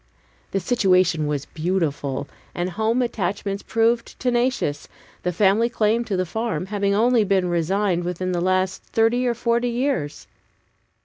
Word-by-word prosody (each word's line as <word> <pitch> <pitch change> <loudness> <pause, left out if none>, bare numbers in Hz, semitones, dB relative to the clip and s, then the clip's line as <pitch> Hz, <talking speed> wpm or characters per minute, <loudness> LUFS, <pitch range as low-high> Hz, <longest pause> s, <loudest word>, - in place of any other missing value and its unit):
The 195 - -1
situation 185 -6 +2
was 145 -1 -2
beautiful, 155 -5 -2 0.3
and 175 +1 -2
home 220 +6 +1
attachments 200 -2 -2
proved 230 +1 0
tenacious, 245 - 0 0.3
the 180 - -1
family 205 +6 +3
claim 230 0 +1
to 200 -4 -2
the 185 - 0
farm 215 -3 -2
having 200 0 0
only 235 +1 +4
been 195 -2 +1
resigned 175 +2 0
within 180 +1 -2
the 175 -1 -1
last 185 +1 0
thirty 235 +3 +1
or 240 - +1
forty 235 +1 +1
years. 240 - -2
195 Hz, 140 wpm, -23 LUFS, 180-235 Hz, 0.3 s, only